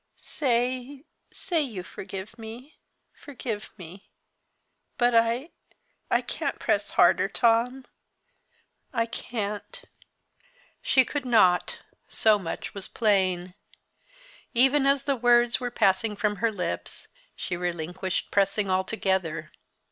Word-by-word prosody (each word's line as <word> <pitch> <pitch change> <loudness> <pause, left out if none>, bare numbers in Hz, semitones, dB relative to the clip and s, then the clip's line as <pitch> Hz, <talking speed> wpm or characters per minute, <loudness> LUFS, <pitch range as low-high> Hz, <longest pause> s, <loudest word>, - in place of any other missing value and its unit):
Say 255 +1 -2 0.2
say 340 -4 -1
you 220 -11 -4
forgive 195 +4 -8
me 235 +6 -10 0.3
forgive 235 -6 -6
me! 185 +1 -12 0.9
but 245 0 +3
I 230 +7 +2 0.6
I - - +3
can't - - -3
press - - 0
harder, - - +5
Tom 245 +3 +2 1.1
I 230 -5 +1
can't!" 210 -3 -5 1.0
She 260 -1 +4
could 290 +2 -3
not 200 -8 +3 0.3
so 215 -2 +3
much 170 -4 -5
was 200 -2 -5
plain. 185 -5 +1 1.0
Even 270 +3 +4
as 275 0 +3
the 280 -1 +1
words 240 0 +4
were 250 -1 -2
passing 210 -1 +2
from 205 0 0
her 225 +2 +1
lips, 185 -4 -3 0.3
she 175 - -3
relinquished 175 +1 -3
pressing 200 0 +1
altogether. 185 -5 -1
225 Hz, 110 wpm, -26 LUFS, 190-250 Hz, 1.1 s, harder